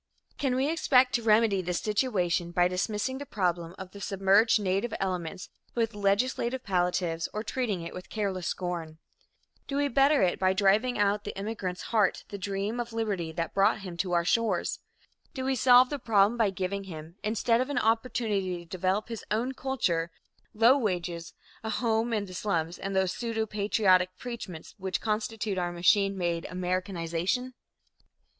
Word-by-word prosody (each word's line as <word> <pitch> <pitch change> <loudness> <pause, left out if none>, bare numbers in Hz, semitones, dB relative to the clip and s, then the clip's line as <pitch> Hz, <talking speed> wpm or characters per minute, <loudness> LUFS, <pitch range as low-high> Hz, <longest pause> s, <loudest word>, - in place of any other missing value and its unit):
Can 265 -3 +1
we 265 +2 +1
expect 260 -5 +3
to 240 - +2
remedy 215 -3 +3
this 180 -1 -2
situation 195 -6 0
by 175 0 +3
dismissing 210 +8 -2
the 285 - -6
problem 175 -3 -1
of 190 -1 -8
the 200 - -11
submerged 195 +4 +3
native 200 +3 -1
elements 185 -1 -3 0.3
with 230 -1 0
legislative 235 +5 0
palliatives 175 -3 0
or 215 - -2
treating 220 -7 -2
it 170 - -7
with 180 - -9
careless 195 -4 -2
scorn? 170 -3 -4 0.7
Do 280 - -2
we 285 0 +2
better 275 0 +4
it 180 - +1
by 185 0 +3
driving 210 +5 +3
out 205 0 +3
of - - -36
the - - -6
immigrant's 195 -3 -4
heart 210 -4 +2
the 200 - -6
dream 200 +4 -2
of 235 -1 -4
liberty 200 -8 -2
that 165 +1 -3
brought 200 +2 +3
him 185 -3 -7
to 180 +1 -1
our 170 0 +2
shores? 230 +3 +1 0.6
Do 260 -1 -3
we 265 - +1
solve 250 +1 +6
the 290 - -2
problem 215 -2 +3
by 225 -4 +2
giving 195 +1 -3
him, 165 -1 -9
instead 230 +2 +2
of 260 - -2
an 285 - -2
opportunity 220 -5 0
to 170 - -10
develop 185 +4 -1
his 230 -2 -6
own 235 +5 0
culture, 185 -12 -1 0.5
low 235 +6 +6
wages, 175 -6 -3 0.3
a 220 - -3
home 225 +1 0
in 210 -3 0
the 185 - -10
slums 175 -4 -2
and 195 0 -4
those 190 -1 +2
pseudo 230 +1 -2
patriotic 195 -3 +2
preachments 225 -9 -7
which 190 -1 -2
constitute 215 -2 -2
our 175 -1 -1
machine 195 +3 +3
made 170 -2 -1
"Americanization"? 180 +5 -2
200 Hz, 170 wpm, -28 LUFS, 180-230 Hz, 0.7 s, solve